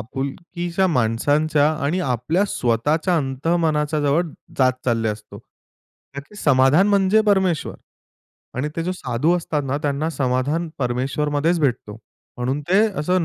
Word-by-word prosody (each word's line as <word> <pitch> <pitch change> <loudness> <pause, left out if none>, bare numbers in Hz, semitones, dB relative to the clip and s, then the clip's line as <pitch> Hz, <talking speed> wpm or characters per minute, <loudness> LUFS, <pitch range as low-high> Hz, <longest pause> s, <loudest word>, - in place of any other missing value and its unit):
आपुलकीच्या 170 - -3
माणसांच्या 145 +3 +2 0.2
आणि 170 +6 0
आपल्या 135 - 0
स्वतःच्या 150 - 0
अंतःमनाच्या 150 +2 0
जवळ 145 +4 +2 0.4
जात 130 -1 +4
चालले 115 -2 +1
असतो. 105 0 -7
कारण 140 +1 -16
की 210 - -18
समाधान 145 +7 +4
म्हणजे 200 +1 +3
परमेश्वर. 190 -6 +1 0.8
आणि 135 +4 -2
ते 165 - -1
जो 180 +2 -2
साधू 150 +3 0
असतात 155 -3 -2
ना, 140 +2 -2
त्यांना 145 +1 -1
समाधान 140 +4 -1
परमेश्वरमध्येच 145 +6 0
भेटतो. 115 -6 -1 0.4
म्हणून 130 +4 -2
ते 195 +3 +4 0.2
असं 180 +3 +1
150 Hz, 125 wpm, -21 LUFS, 130-170 Hz, 0.8 s, जात